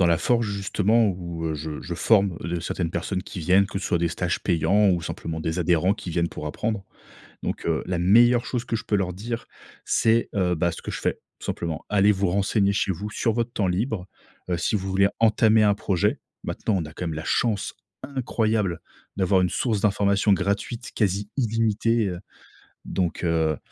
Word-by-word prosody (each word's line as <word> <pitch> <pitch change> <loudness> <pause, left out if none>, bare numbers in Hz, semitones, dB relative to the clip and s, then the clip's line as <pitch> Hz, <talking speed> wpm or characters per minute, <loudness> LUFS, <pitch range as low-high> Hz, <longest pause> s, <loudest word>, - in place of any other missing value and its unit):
dans 90 - +5
la 85 -1 +4
forge, 115 +6 +1
justement 100 +3 +2
où, 85 -3 -5
heu, 80 - -2
je 75 0 -5
je 85 - -5
forme 100 -1 +3
les, 85 +2 -3
heu - - -3
certaines 85 0 -2
personnes 90 +2 -2
qui - - -8
viennent, 90 +4 +4
que 95 - -4
ce 95 - -6
soit 85 - +1
des 85 - +1
stages 90 +1 -2
payants 100 +4 +3
ou 90 -3 +2
simplement 80 0 -5
des 80 +2 -2
adhérents, 90 +2 +3
qui 105 - -7
viennent 85 0 0
pour 75 - -6
apprendre. 105 +6 -3 0.6
Donc - - -4
heu, 80 -2 +1
la 90 - -1
meilleure 120 +7 +5
chose 120 0 -2
que 115 -1 -2
je - - -4
peux 105 - +1
leur 95 -3 0
dire 115 +6 -5 0.4
c'est, 115 +1 +2
heu, 90 -3 +2
bah, 85 +1 +1
ce 80 - -9
que - - -4
je - - -4
fais, - - +1 0.3
tout - - -9
simplement: 80 -2 -3
«Allez 105 0 +4
vous 100 0 0
renseigner 100 +1 +2
chez 100 - +1
vous, 100 +4 -5
sur 115 +1 0
votre 120 +1 -1
temps 100 -5 0
libre, 95 +1 -1 0.5
heu, 85 - +1
si 85 +6 0
vous 95 -1 -2
voulez 95 +1 +3
entamer 110 -1 +4
un 105 -1 +5
projet.» 95 -3 0 0.2
maintenant, 110 - -1
on 85 - -2
a, 80 - -10
quand 90 - -4
même, 80 - -3
la 80 - -5
chance 110 -4 0 0.3
incroyable 110 - -1 0.3
d'avoir 95 0 +3
une 90 - +2
source 110 +2 0
d'information 100 0 +3
gratuite, 100 +5 -2
quasi 100 -1 0
illimitée, 115 -1 +1
heu, 90 -1 -5 0.7
donc 90 -1 -2
heu, 80 -2 +1
95 Hz, 210 wpm, -24 LUFS, 85-110 Hz, 0.7 s, dans